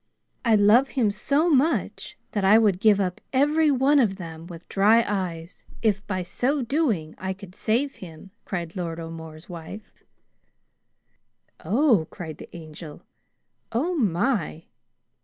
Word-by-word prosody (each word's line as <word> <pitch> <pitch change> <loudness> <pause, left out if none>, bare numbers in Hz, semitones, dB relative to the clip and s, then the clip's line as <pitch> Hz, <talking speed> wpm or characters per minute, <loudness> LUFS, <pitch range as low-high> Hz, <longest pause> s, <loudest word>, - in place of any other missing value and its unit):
"I 230 -3 +4
love 215 +6 +5
him 220 -5 +3
so 280 +10 +1
much 310 0 0
that 205 - -2
I 200 +3 +6
would 205 -5 +3
give 210 -1 +4
up 180 -2 -2
every 295 +4 +3
one 280 +2 +3
of 210 -7 +2
them 165 -3 -9
with 170 -1 -11
dry 220 +4 +4
eyes 180 -4 -4 0.2
if 205 -3 +1
by 185 -3 -2
so 255 +10 -1
doing 235 - -1
I 190 0 -3
could 190 -1 -13
save 245 +8 -1
him," 175 +1 -12
cried 170 -3 -5
Lord 170 -3 -4
O'More's 160 -1 -9
wife. 180 +5 -10 1.6
"Oh!" 225 - +3
cried 160 -3 -8
the - - -10
Angel. 155 -1 -11 0.7
"Oh, 295 +11 0
my!" 205 - 0
200 Hz, 140 wpm, -24 LUFS, 170-250 Hz, 1.6 s, I